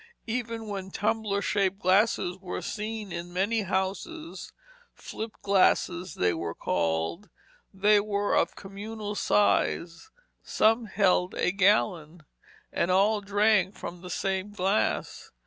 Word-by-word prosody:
Even 230 -1 -3
when 195 -3 -5
tumbler 205 0 -1
shaped 195 -2 +1
glasses 190 -1 +2
were 180 -1 -5
seen 215 -2 -5
in 175 +1 -6
many 200 +5 0
houses, 200 - -4 0.4
flip 220 0 -7
glasses, 185 -2 +2
they 90 -1 +2
were 85 -1 -4
called, 80 - -1 0.4
they 205 +2 +4
were 205 0 -1
of - - +1
communal 205 +2 -6
size, 205 - +1 0.3
some 225 +2 +2
held 185 -3 +2
a - - +1
gallon, 180 -5 +1 0.5
and 170 - 0
all 205 +3 +3
drank 205 0 +2
from 175 0 -8
the 180 - -9
same 190 +5 -2
glass. 205 +1 -1
200 Hz, 120 wpm, -27 LUFS, 185-215 Hz, 0.5 s, they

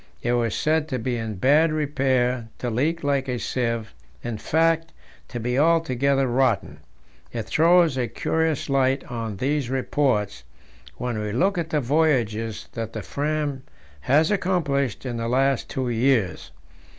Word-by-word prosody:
It 120 - +1
was 115 -3 0
said 155 0 +1
to 130 -5 -2
be 125 +1 -2
in 110 -2 -4
bad 145 - +4
repair, 130 -5 0
to 120 - -3
leak 155 +8 0
like 140 -2 0
a 125 -1 -1
sieve 115 -2 -2 0.3
in 115 -3 -4
fact, 165 +3 +1 0.3
to 120 - -6
be 125 +3 0
altogether 140 -4 +2
rotten. 130 +1 0 0.5
It 115 -2 -3
throws 165 +1 +4
a 125 -2 0
curious 160 +6 -1
light 135 -1 +2
on 115 -4 -4
these 140 +2 -1
reports 125 - 0 0.5
when 120 -3 -3
we 105 0 -3
look 180 - +1
at 165 -1 -3
the 150 -3 +1
voyages 120 -7 0
that 115 -1 -5
the 110 - -5
Fram 145 - -2 0.4
has 150 - +3
accomplished 145 - 0
in 120 -2 -3
the 115 0 -2
last 135 +2 +1
two 130 -1 -2
years. 120 -4 +1
130 Hz, 150 wpm, -24 LUFS, 120-150 Hz, 0.5 s, bad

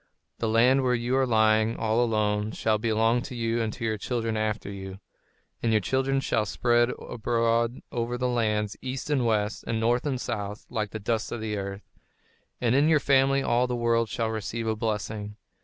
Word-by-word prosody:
The 115 - 0
land 125 +4 +4
where 125 -1 +2
you 120 +2 -1
are 135 -1 +2
lying 110 -1 +3
all 115 +2 +1
alone, 105 -2 0
shall 110 -1 +1
belong 115 +2 +2
to 130 0 -7
you 115 0 0
and 110 -1 -1
to 120 - -5
your 110 -2 -1
children 115 -1 -2
after 110 -1 -2
you; 95 -1 -8 0.6
and 115 - +1
your 110 - +4
children 135 +5 0
shall 110 -4 +1
spread 120 +3 +2
abroad 115 +1 0
over 120 +1 -2
the 125 0 0
lands, 105 -4 0
east 130 +3 -4
and 130 -5 +2
west, 105 -1 0
and 115 -1 -1
north 120 +5 +1
and 130 -3 -1
south, 105 -3 -4
like 110 -3 -2
the 110 - -5
dust 110 +1 -2
of 120 - -3
the 110 -1 -3
earth; 100 0 -5 0.8
and 120 -1 +1
in 145 +4 +4
your 155 -2 +5
family 135 0 +3
all 125 0 +2
the 125 - -2
world 115 -1 +1
shall 115 +2 -1
receive 110 +1 -4
a 110 0 0
blessing. 105 -1 -3
115 Hz, 195 wpm, -27 LUFS, 110-120 Hz, 0.8 s, your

